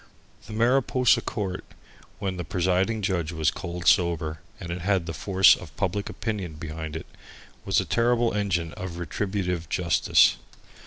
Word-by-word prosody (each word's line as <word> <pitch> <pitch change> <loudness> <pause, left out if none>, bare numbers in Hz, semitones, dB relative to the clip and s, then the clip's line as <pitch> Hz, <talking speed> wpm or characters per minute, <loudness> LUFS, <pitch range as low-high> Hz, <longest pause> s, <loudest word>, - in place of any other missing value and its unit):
The 110 - -8
Mariposa 125 +1 +3
court, 95 -6 -4 0.5
when 95 -2 -3
the 90 - -3
presiding 95 +5 0
judge 90 -5 -1
was 80 -2 +1
cold 85 -1 -6
sober, 85 -7 +2 0.2
and 85 -3 -6
it 90 +1 -4
had 95 -2 +1
the 85 - -4
force 95 +1 +5
of 80 -5 -12
public 100 +1 -1
opinion 105 -6 -4
behind 80 0 -6
it, 80 - -5 0.6
was - - +2
a - - -1
terrible 120 0 +2
engine 85 -6 -1
of 90 +1 -6
retributive 90 -2 -3
justice. 85 -3 +3
90 Hz, 150 wpm, -26 LUFS, 85-105 Hz, 0.6 s, force